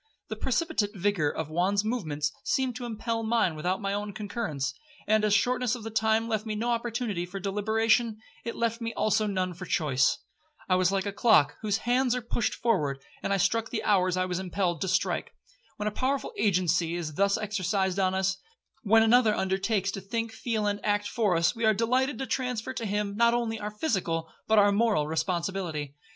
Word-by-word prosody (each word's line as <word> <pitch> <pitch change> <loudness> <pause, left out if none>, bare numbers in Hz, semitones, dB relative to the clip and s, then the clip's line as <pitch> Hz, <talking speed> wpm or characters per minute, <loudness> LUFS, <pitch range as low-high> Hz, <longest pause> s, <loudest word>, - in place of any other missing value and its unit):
The - - -3
precipitate 225 -6 -1
vigour 190 -5 +1
of 155 +1 -4
Juan's 190 +5 +1
movements 155 -11 -1
seemed 260 -3 0
to 250 - -6
impel 230 0 -2
mine 225 -6 +1
without 180 +5 -1
my 195 0 -1
own 205 0 -3
concurrence; 195 - -3 0.3
and 215 0 +3
as 210 - +2
the 210 - +6
shortness 250 +1 +1
of 235 - -9
the 225 - -5
time 220 +1 +2
left 220 -2 -1
me 215 -1 -4
no 235 +3 -1
opportunity 230 -5 -2
for 180 +3 -6
deliberation, 220 +3 +1 0.3
it 230 - -4
left 230 0 -1
me 230 0 -4
also 215 0 +1
none 185 -2 -1
for 180 +1 -9
choice. 140 -4 +2 0.5
I 185 - +2
was 185 0 +3
like 195 0 0
a 200 - -3
clock 205 - +4
whose 210 -2 0
hands 250 +1 +2
are 250 - -2
pushed 235 0 -1
forward, 155 - 0 0.2
and - - -2
I 200 - +3
struck 225 +3 +1
the 230 - -3
hours 185 -3 +2
I 185 - +1
was 180 -1 -2
impelled 180 -3 -1
to 190 - 0
strike. - - 0 0.4
When 210 - -2
a - - 0
powerful 270 - -1
agency 175 - +1
is 165 -3 -4
thus 200 +5 +2
exercised 195 -2 -1
on 190 -1 +2
us,—when 220 - 0
another 225 -1 +5
undertakes 195 +1 0
to 195 - -6
think, 230 +3 -3
feel, 220 -1 -2
and 205 0 -1
act 205 0 +1
for 210 -6 +1
us, 170 +7 +2
we 230 - -4
are 220 -1 +4
delighted 255 +5 +1
to 265 - -3
transfer 250 -1 -2
to 230 -4 -4
him, 205 0 -1
not 235 +2 +4
only 225 -2 -1
our 210 - -3
physical, 190 - -2
but 220 - +3
our 205 0 +6
moral 205 -7 +2
responsibility. 165 -2 -2
210 Hz, 200 wpm, -28 LUFS, 185-230 Hz, 0.5 s, the